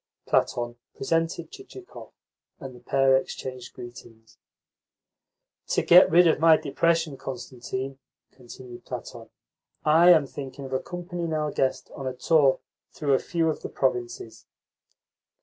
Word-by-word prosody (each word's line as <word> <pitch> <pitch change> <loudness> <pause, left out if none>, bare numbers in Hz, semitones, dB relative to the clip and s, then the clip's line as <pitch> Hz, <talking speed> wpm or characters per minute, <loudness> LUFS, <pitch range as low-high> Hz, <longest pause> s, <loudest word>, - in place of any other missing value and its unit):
Platon 120 0 0 0.2
presented 165 +2 -2
Chichikov, 390 -1 -12 0.5
and 135 -1 -8
the - - -14
pair 135 +2 +3
exchanged 130 -1 -5
greetings. 120 -2 -13 1.3
"To - - 0
get 180 +2 +7
rid 175 +1 +6
of 160 -3 +3
my 160 0 +6
depression, 165 0 0
Constantine," 130 +1 -6 0.3
continued 125 -1 -12
Platon, - - -8 0.6
"I 165 +3 +6
am 160 -5 +6
thinking 135 0 -8
of 130 - -7
accompanying 175 +3 -4
our 150 -1 -1
guest 130 -1 -2
on 135 - -6
a 130 - -4
tour 140 -1 +3 0.3
through 145 -3 -1
a 130 - +3
few 165 -2 -1
of 155 - -2
the - - -6
provinces." 120 -3 -3
135 Hz, 130 wpm, -25 LUFS, 130-165 Hz, 1.3 s, get